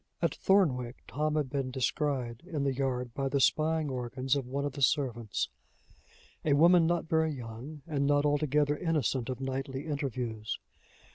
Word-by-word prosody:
At - - +1
Thornwick, 130 -11 +2
Tom 155 +1 -1
had 145 -4 0
been 135 -2 -1
descried 130 -2 -1
in 155 -6 -2
the 135 -1 +1
yard, 125 -2 -2
by 135 +1 -1
the 140 - +1
spying 155 +3 +2
organs 130 +2 -1
of 135 -3 -2
one 140 +2 -2
of 145 - -1
the 140 - -7
servants 120 -7 +1 1.0
a 150 - +3
woman 170 +3 +6
not 170 -1 0
very 160 0 +2
young, 130 +3 -8
and 140 -4 0
not 145 0 +3
altogether 145 0 +2
innocent 145 - 0
of 130 - -3
nightly 135 +1 -3
interviews. 125 -7 -3
140 Hz, 160 wpm, -30 LUFS, 130-150 Hz, 1.0 s, woman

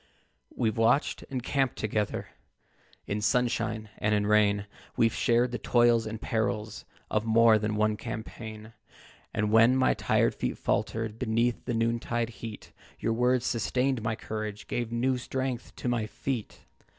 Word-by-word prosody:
"We've 115 0 0
watched 115 +5 +2
and 130 -3 -3
camped 135 -2 0
together 105 -1 -2 0.8
In 105 +1 -2
sunshine 115 -1 0
and 105 0 +2
in 105 0 +1
rain; 105 -1 +3 0.3
We've 115 -1 +3
shared 120 +1 +2
the 120 - -3
toils 120 -2 +3
and 110 0 -5
perils 110 -1 -2 0.3
Of 105 - +1
more 115 0 +5
than 105 0 -1
one 105 0 +1
campaign; 110 -1 -7 0.6
And 105 0 0
when 115 +3 +6
my 130 0 +3
tired - - +2
feet - - -3
faltered, 110 0 -1
Beneath 120 0 0
the 120 - -1
noontide 115 0 0
heat, 110 -2 -8 0.3
Your 115 - 0
words 125 +1 +2
sustained 125 +2 0
my 110 0 -1
courage, 110 -1 -5
Gave 120 -1 -2
new 125 +2 +1
strength 130 -1 -4
to - - -5
my 120 -3 0
feet. 125 0 -4
115 Hz, 150 wpm, -28 LUFS, 110-120 Hz, 0.8 s, when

